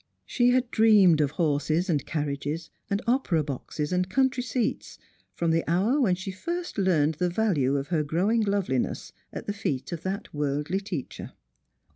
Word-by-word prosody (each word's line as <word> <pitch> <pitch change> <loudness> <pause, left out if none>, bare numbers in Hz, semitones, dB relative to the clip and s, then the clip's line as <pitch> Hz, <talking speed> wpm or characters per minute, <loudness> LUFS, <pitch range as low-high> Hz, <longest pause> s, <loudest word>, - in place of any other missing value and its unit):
She 245 -1 +2
had 250 -1 +1
dreamed 205 -8 +5
of 145 - +2
horses 155 +3 0
and 150 -7 +1
carriages, 150 +1 -3 0.2
and 200 +3 -1
opera 235 - +1
boxes 150 +2 -4
and 180 0 0
country 260 +3 +1
seats, 240 -1 -2 0.4
from 170 -1 0
the 165 0 +2
hour 210 - +2
when 190 -8 +3
she 190 +2 -6
first 340 - -4
learned 160 -5 +2
the 180 -1 +1
value 170 -9 +1
of 140 +2 -4
her 165 -3 +1
growing 185 +10 +1
loveliness 200 - -1 0.2
at - - -7
the 205 - -2
feet 135 -10 -3
of 170 -2 -4
that 195 +2 -4
worldly 145 +5 -1
teacher. 190 - -6
180 Hz, 165 wpm, -26 LUFS, 150-210 Hz, 0.4 s, dreamed